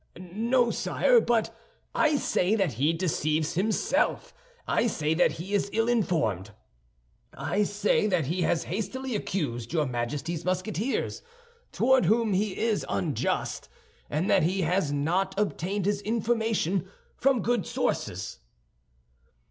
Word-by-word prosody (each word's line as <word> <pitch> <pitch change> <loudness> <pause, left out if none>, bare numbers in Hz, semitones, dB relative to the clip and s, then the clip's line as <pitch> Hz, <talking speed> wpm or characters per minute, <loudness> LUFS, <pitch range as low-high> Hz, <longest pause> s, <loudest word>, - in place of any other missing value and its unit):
"No, 230 +7 +1
sire, - - +3
but 225 - 0 0.4
I 310 -1 +3
say 215 -6 +1
that 195 - +1
he 140 +8 +2
deceives 155 -2 0
himself. 205 +5 0 0.3
I - - +2
say 155 -7 0
that 175 - +3
he 185 +5 -7
is 200 0 +1
ill 225 +1 +1
informed. 160 - 0 0.9
I 205 - -1
say 205 +1 +1
that 180 -7 +1
he 170 +6 -1
has 170 - +1
hastily 245 +7 -3
accused 125 - -3
your 155 -3 +2
Majesty's 145 +7 -3
Musketeers, 185 +7 -2 0.5
toward 265 -6 +3
whom 220 +2 +2
he 200 +1 0
is 225 -2 0
unjust, 145 -10 -2 0.4
and 155 +6 -1
that 195 - +4
he 185 +4 +1
has 165 -2 +1
not 180 +7 0
obtained 200 -1 -1
his 205 0 0
information 220 -5 0 0.3
from 260 -5 +2
good 240 -6 0
sources." - - -2
190 Hz, 130 wpm, -27 LUFS, 160-220 Hz, 0.9 s, that